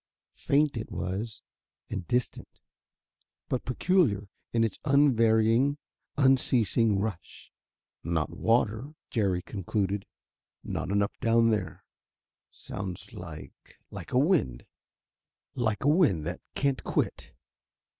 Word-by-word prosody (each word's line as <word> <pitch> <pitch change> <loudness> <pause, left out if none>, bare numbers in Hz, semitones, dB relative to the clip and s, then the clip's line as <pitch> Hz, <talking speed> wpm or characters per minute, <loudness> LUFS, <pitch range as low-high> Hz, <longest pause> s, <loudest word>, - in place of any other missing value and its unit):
Faint 145 -2 +2
it 110 - -5
was, 100 +4 -4 0.4
and 95 -3 -5
distant, 125 0 -2 0.9
but 130 - -1
peculiar 125 - +1 0.2
in 115 -1 +2
its 110 -4 -2
unvarying, 125 -2 +4 0.4
unceasing 120 -5 +3
rush. 100 -3 -5 0.5
"Not 80 -1 -1
water," 115 - +1 0.2
Jerry 95 -6 0
concluded; 100 0 -2 0.6
"not - - -3
enough 100 +1 0
down 115 0 +4
there. 95 -7 -3 0.6
Sounds 95 -2 -7
like - - -11
like - - -8
a - - +2
wind 140 - +2 0.9
like 110 -5 -1
a - - +2
wind 145 - +3
that - - -4
can't 140 -2 0
quit. - - -2
115 Hz, 105 wpm, -28 LUFS, 100-130 Hz, 0.9 s, unvarying